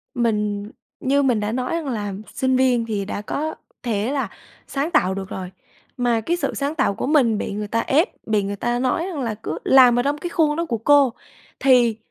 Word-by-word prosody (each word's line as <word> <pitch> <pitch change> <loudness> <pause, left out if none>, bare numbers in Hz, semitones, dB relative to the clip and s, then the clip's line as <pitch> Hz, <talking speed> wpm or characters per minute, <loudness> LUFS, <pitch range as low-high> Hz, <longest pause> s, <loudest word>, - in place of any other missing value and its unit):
Mình 210 -3 -1 0.3
như 280 +2 +2
mình 245 -5 +2
đã 210 +1 -2
nói 250 +4 -2
rằng 325 -4 -3
là 210 -5 -3 0.2
sinh 260 0 +1
viên 255 -3 +3
thì 205 -3 -2
đã 205 - -4
có 310 +8 -3 0.3
thể 225 +1 -1
là 270 -7 -1 0.4
sáng 285 +4 -2
tạo 190 - +3
được 190 0 -5
rồi. 185 -1 -6 0.5
Mà 240 -2 +1
cái 345 +9 -1
sự 280 -5 -2
sáng 285 +2 -2
tạo 260 -9 +1
của - - -3
mình 255 -8 +3
bị 200 - -3
người 210 0 -4
ta 230 +2 0
ép, 300 - +2 0.2
bị 210 -2 +1
người 200 +1 -3
ta 240 +4 -1
nói 260 +7 0
rằng 345 -6 -5
là 230 -3 -2
cứ 220 - -5
làm 250 -2 +6
ở - - +1
trong 285 +1 0
cái 345 +3 -5
khuôn 310 -3 +2
đó 335 - 0
của 235 -6 -2
cô 275 +1 +4 0.5
thì 245 -4 +4
245 Hz, 225 wpm, -22 LUFS, 210-280 Hz, 0.5 s, làm